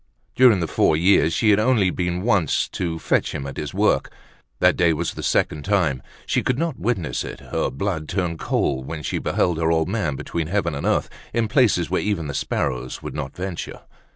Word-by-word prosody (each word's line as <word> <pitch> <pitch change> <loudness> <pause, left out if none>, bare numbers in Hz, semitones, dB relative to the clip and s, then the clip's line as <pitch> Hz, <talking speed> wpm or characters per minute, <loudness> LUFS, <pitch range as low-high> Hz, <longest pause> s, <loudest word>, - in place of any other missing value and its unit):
During 120 -8 +5
the 85 - -1
four 75 - +2
years, 85 -1 +4
she 105 +6 +3
had 100 - +4
only 110 -5 +3
been 90 0 -2
once 100 - +2
to 85 -2 -3
fetch - - 0
him 70 - -4
at 70 - -7
his - - -4
work. - - +1 0.5
That - - +4
day 85 -2 +3
was 80 +2 -2
the - - -7
second 75 -1 0
time. 90 -10 +1 0.2
She - - +1
could 125 - 0
not 165 -2 -2
witness 95 -11 -1
it, - - -7
her - - -2
blood 80 0 -3
turned 90 -4 -2
cold 65 -2 -1
when 80 -2 -5
she - - -2
beheld 85 -3 0
her 80 -1 +1
old 80 -1 +2
man 100 -9 -1
between 80 +3 -3
heaven 90 -3 0
and 70 - -3
earth, - - +1 0.3
in 115 -1 +1
places 105 - +2
where - - +1
even 100 -6 -1
the 70 - -4
sparrows 65 -2 -2
would - - -6
not 70 -3 -5
venture. 90 -1 -5
85 Hz, 210 wpm, -22 LUFS, 75-100 Hz, 0.5 s, During